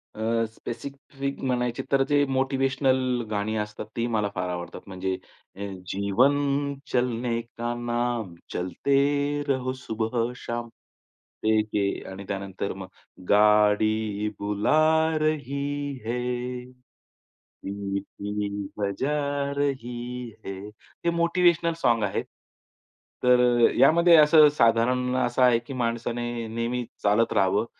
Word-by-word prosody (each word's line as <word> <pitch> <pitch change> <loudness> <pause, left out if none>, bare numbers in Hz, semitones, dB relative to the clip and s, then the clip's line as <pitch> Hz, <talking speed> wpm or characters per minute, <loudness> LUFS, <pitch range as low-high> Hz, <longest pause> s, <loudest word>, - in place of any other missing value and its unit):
अ, 115 +1 0
specific 140 +2 -6
म्हणायचे 125 -2 -1
तर 135 - +4
जे 145 0 +4
मोटिव्हेशनल 130 -1 +1
गाणी 105 +1 -1
असतात 105 0 -4
ती 115 - 0
मला 105 -1 +1
फार 90 0 -2
आवडतात. 90 0 -5
म्हणजे 95 0 -3 0.8
जीवन 100 +9 +3 0.5
चलनेका 120 -1 -1
नाम, 120 -4 -2 0.2
चलते 140 +9 +1
रहो 130 -2 0
सुबह 115 -1 -2
शाम 120 -1 -5 0.8
ते 110 0 +3
एक 105 - -1
आहे 100 -1 0
आणि 95 +1 -8
त्यानंतर 100 0 -4
मग 95 0 -8 0.4
गाडी 105 0 +3
बुला 105 +8 +1 0.4
रही 145 -2 -2
है, 125 +1 -3 0.7
सीटी 100 +1 -5
बजा 105 +9 -1 0.4
रही 125 -3 -3 0.2
है. 95 -1 -5 0.5
हे - - +4
मोटिव्हेशनल 170 -1 +3
सॉन्ग 115 -2 +3
आहेत. 100 - -1 1.0
तर 125 0 +5 0.4
यामध्ये 170 +6 +6
असं 150 0 +8
साधारण 125 +2 +2
असं 125 0 0
आहे, 125 -2 +5
की 120 +3 -9
माणसाने 120 -1 -2
नेहमी 115 +2 -2 0.2
चालत 105 +3 +3
राहावं, 100 +1 +2
120 Hz, 105 wpm, -26 LUFS, 105-130 Hz, 1.0 s, असं